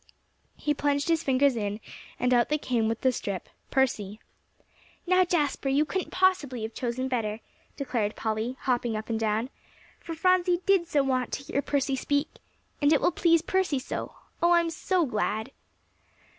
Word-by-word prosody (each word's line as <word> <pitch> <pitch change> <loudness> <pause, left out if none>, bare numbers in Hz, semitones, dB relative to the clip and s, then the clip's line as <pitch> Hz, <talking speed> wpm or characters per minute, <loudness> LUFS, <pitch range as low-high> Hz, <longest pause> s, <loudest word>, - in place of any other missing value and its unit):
He 295 - 0
plunged 285 +1 0
his 330 -1 +3
fingers 270 -2 +3
in, 205 -1 -2 0.4
and 250 +1 +2
out 240 -1 +3
they 300 - +2
came 240 -6 0
with 225 0 -2
the 260 - +3
strip, 200 -6 -4 0.2
"Percy." 215 -6 0 0.9
"Now, 370 +1 +4
Jasper, 300 -6 0
you 285 +3 +3
couldn't 375 +3 -3
possibly 335 -11 +1
have 220 +1 -5
chosen 255 +1 -2
better," 225 -4 -2 0.4
declared 230 -7 -1
Polly, 220 +3 -2
hopping 240 -3 0
up 215 +2 -5
and 225 - 0
down, 220 +4 0 0.5
"for 330 - -7
Phronsie 360 0 +2
did 385 -4 +3
so 290 -4 +2
want 255 -2 0
to 275 - -3
hear 280 - -1
Percy 280 -1 0
speak. 285 +3 -1 0.4
And 290 +1 +4
it 305 - +5
will - - +2
please 335 -1 +3
Percy 375 -6 +1
so. 260 - -5 0.3
Oh, 345 +1 +5
I'm 340 -1 +3
so 350 +1 +1
glad!" 220 -1 -2
270 Hz, 170 wpm, -27 LUFS, 230-325 Hz, 0.9 s, it